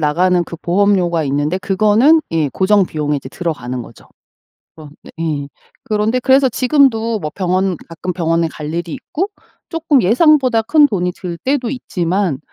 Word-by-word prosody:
나가는 175 +4 +2
그 170 - -9
보험료가 180 -2 +1
있는데 145 +6 -1
그거는 215 - +3
예 155 -3 +1
고정 195 +5 +2
비용에 150 -3 -2
이제 135 - -7
들어가는 130 -7 -4
거죠. 115 - -15 0.7
그런 155 -2 -12
네 - - -13 0.3
예. - - -9 0.4
그런데 215 +3 0
그래서 265 +1 +3
지금도 230 -4 +2
뭐 150 -3 -5
병원, 185 -1 0
가끔 175 +2 -5
병원에 165 -1 0
갈 155 0 -7
일이 170 -2 -4
있고 375 +6 -4 0.4
쪼끔 325 -5 +1
예상보다 255 - +4
큰돈이 215 - +2
들 175 -2 -6
때도 260 -3 -1
있지만 180 - -2
185 Hz, 330 characters per minute, -16 LUFS, 165-230 Hz, 0.7 s, 예상보다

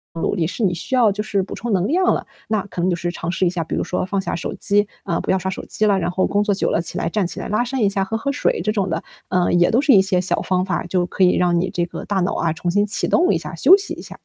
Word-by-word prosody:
努 165 - -1
力， 165 -4 0
是 205 +6 -4
你 180 -3 +2
需 215 +9 -3
要 230 -5 +4
就 210 - -3
是 200 -3 -1
补 - - -8
充 235 -3 -3
能 185 +1 +1
量 365 +6 +2
了。 - - -3 0.2
那 210 -3 -1
可 180 - -8
能 185 - +2
就 175 - +1
是 175 0 -3
尝 170 -1 -5
试 185 +1 0
一 - - +3
下， 175 -2 -2
比 160 - -4
如 - - -1
说 180 - -2
放 195 0 -1
下 - - -3
手 170 - -4
机， 205 +2 +1 0.2
嗯， 170 - -1
不 - - -1
要 190 - +2
刷 190 - -3
手 - - -7
机 215 - -1
了， 200 -2 +3
然 170 0 -1
后 185 +1 +1
工 205 - +1
作 205 -1 +1
久 - - 0
了 165 - +1
起 - - -4
来 165 - -1
站 205 +1 0
起 - - -7
来 - - -5
拉 215 +3 +1
伸 250 0 -3
一 200 - +3
下， 195 -1 0
喝 220 - -4
喝 280 +5 -2
水 - - 0
这 215 - +1
种 200 -4 -1
的， 165 0 -2 0.3
嗯， 175 -1 +2
也 175 - +4
都 245 +5 +3
是 290 - +3
一 195 - +7
些 190 -2 +1
小 185 - 0
方 185 -1 0
法， 180 -3 -2
就 175 0 0
可 190 +2 -1
以 180 - +3
让 175 -1 +2
你 185 - -1
这 175 - -1
个 170 - -8
大 200 -2 -1
脑 180 - -1
啊， 165 - 0
重 175 +2 -3
新 205 +2 +2
启 210 +2 0
动 360 +2 +3
一 - - +2
下， - - -7
休 380 - +7
息 405 - -4
一 - - -9
下。 - - -9
190 Hz, 360 characters per minute, -20 LUFS, 175-210 Hz, 0.3 s, 一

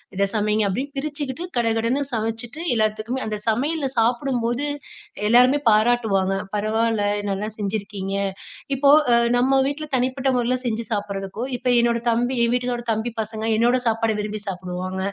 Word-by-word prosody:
இத 200 +1 +2
சமைங்க!" 210 0 +1
அப்படின்னு 275 +9 -3
பிரிச்சுக்கிட்டு, 290 +1 -4
கடகடன்னு 230 +4 +1
சமச்சுட்டு 225 +6 -3
எல்லாத்துக்குமே 215 +3 -1
அந்த 215 -1 -2
சமையல்ல 280 +6 +1
சாப்பிடும்போது, 240 +2 +1 0.6
எல்லோருமே 250 +5 +6
பாராட்டுவாங்க. 215 -4 +2 0.2
பரவால்ல, 220 +1 +1 0.3
நல்லா 200 +2 -2
செஞ்சுருக்கீங்க 200 -1 -3 0.6
இப்போ 275 +1 +3 0.2
அ - - +6 0.2
நம்ம 265 +2 +3
வீட்ல 290 +2 -3
தனிப்பட்ட 260 +2 0
மொறைல 245 +1 +1
செஞ்சு 230 -1 -1
சாப்பிட்றதுக்கோ, 205 +1 -3
இப்போ 250 +1 -2
என்னோட 235 0 +2
தம்பி 245 +3 +1
என் 235 - +2
வீட்டுகாரோட 245 -1 -1
தம்பி 220 +2 -2
பசங்க, 220 0 -5
என்னோட 240 +2 +3
சாப்பாடு 225 -1 +1
விரும்பி 210 0 -4
சாப்பிடுவாங்க, 185 0 -4
230 Hz, 135 wpm, -22 LUFS, 215-250 Hz, 0.6 s, எல்லோருமே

